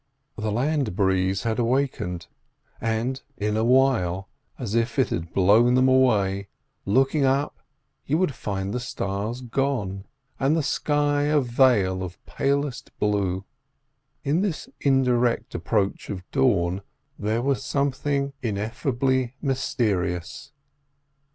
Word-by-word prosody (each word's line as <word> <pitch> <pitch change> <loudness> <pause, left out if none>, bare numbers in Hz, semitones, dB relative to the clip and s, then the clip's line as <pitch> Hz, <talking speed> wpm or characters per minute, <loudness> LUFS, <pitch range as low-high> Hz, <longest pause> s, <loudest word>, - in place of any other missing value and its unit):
The 110 0 -2
land 130 - 0
breeze 95 0 +1
had 115 0 -1
awakened, 120 -8 0 0.6
and 115 +4 -1 0.2
in 105 +1 -1
a 110 - +1
while, 115 -8 +2 0.3
as 115 -5 -4
if 115 0 0
it 130 - +3
had 85 0 -3
blown 110 +6 +4
them 130 +1 +4
away, 100 -7 +3 0.4
looking 135 +7 +3
up, 135 +2 +1 0.5
you 150 - +2
would 180 -5 +1
find 100 -3 -3
the 125 - -1
stars 110 0 -3
gone, 115 -7 -2 0.3
and 140 +3 +2
the 160 - +1
sky 145 +1 +1
a 150 0 +3
veil 120 -7 +3
of 90 -1 -6
palest 140 -2 -1
blue. 100 -2 0 0.8
In 155 +6 +1
this 195 -6 -2
indirect 125 -3 +2
approach 100 -3 -1
of 90 -2 -5
dawn 100 -9 +2 0.4
there 110 +3 0
was 135 -1 0
something 140 0 -1
ineffably 125 +3 -1
mysterious. 100 - -1
120 Hz, 120 wpm, -25 LUFS, 100-135 Hz, 0.8 s, blown